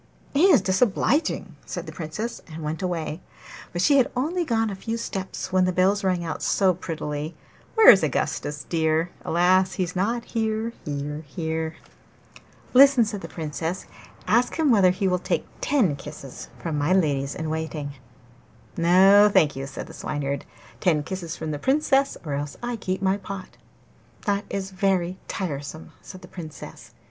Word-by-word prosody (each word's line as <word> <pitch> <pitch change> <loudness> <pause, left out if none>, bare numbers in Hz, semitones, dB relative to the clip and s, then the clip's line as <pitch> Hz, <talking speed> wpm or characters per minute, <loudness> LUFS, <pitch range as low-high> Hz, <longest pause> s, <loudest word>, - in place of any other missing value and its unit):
'He 295 +6 +5
is 310 - +6
disobliging!' 220 - +1
said - - -6
the - - -7
Princess, 180 +9 -5
and 160 0 -7
went 155 +3 -3
away. 170 -3 -3 0.5
But 175 +1 -1
she 285 +5 +5
had 260 - +4
only 325 +8 0
gone 225 -7 0
a - - -4
few 225 +4 -4
steps 190 -4 -5
when 185 -1 +4
the 185 - +1
bells 190 +3 +2
rang 180 -2 0
out 160 - -4
so 190 -2 +3
prettily 155 -2 -5 0.4
'Where 445 -1 +10
is - - +5
Augustus 150 0 -2
dear? 160 +1 0
Alas! 185 +2 +3
he's 180 -1 -2
not 230 +6 0
here, 220 0 -1
here, 150 +1 -4
here.' 160 +1 -3 1.0
'Listen!' 270 -2 +7
said 210 -2 -5
the - - -6
Princess. 160 +2 -4 0.4
'Ask 240 +3 +2
him 315 -4 +3
whether 195 -5 +6
he 190 +2 0
will 180 -1 +1
take - - -1 0.2
ten 220 - +2
kisses 140 -2 -9
from 160 -3 -3
my 145 +5 +2
ladies 145 -6 +1
in 160 - -4
waiting.' 155 -2 -4 0.8
'No, 195 +5 +6
thank 165 -7 +4
you,' 135 +1 -5
said 135 - -7
the - - -12
Swineherd. 140 -2 -3 0.3
'Ten 155 -3 +2
kisses 170 0 -5
from 160 -1 -4
the 145 - -4
Princess, 275 - +2
or 145 - -3
else 145 +1 -4
I 240 0 -2
keep 190 -3 -3
my 190 +1 +2
pot.' 195 -1 -8 0.7
'That 205 0 0
is 195 -1 -3
very 185 -1 0
tiresome!' 150 -3 -5
said 185 -1 -11
the - - -10
Princess. 160 -5 -10
185 Hz, 165 wpm, -25 LUFS, 160-205 Hz, 1.0 s, Where